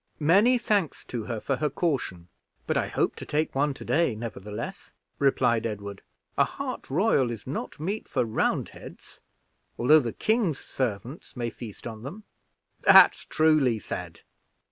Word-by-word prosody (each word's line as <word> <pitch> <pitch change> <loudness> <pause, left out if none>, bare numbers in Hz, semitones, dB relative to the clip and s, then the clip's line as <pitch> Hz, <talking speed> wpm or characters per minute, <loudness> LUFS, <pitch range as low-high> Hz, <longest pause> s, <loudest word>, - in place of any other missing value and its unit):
"Many 200 +11 +5
thanks 205 - -1
to 115 -3 -5
her 115 -3 -3
for 135 +4 -1
her 150 +1 0
caution, 130 - -2 0.4
but - - -1
I - - +1
hope - - 0
to - - -7
take 155 +2 -1
one 140 +1 +1
to - - -10
day, 165 -8 +2
nevertheless," 105 -1 -7 0.3
replied 120 -4 +2
Edward; 100 -2 -6 0.4
"a - - +7
hart - - -5
royal 145 - +2
is 115 -2 -6
not 135 - -5
meat 195 +8 -3
for - - 0
Roundheads, 110 - -3 0.6
although 150 +6 +6
the 120 -5 -2
king's 215 - +1
servants 125 - -5
may 120 -1 -2
feast 110 -3 -10
on 110 -2 -7
them." 170 - -8 0.6
"That's - - +7
truly 155 -7 +3
said. 105 - -7
135 Hz, 150 wpm, -27 LUFS, 115-160 Hz, 0.6 s, a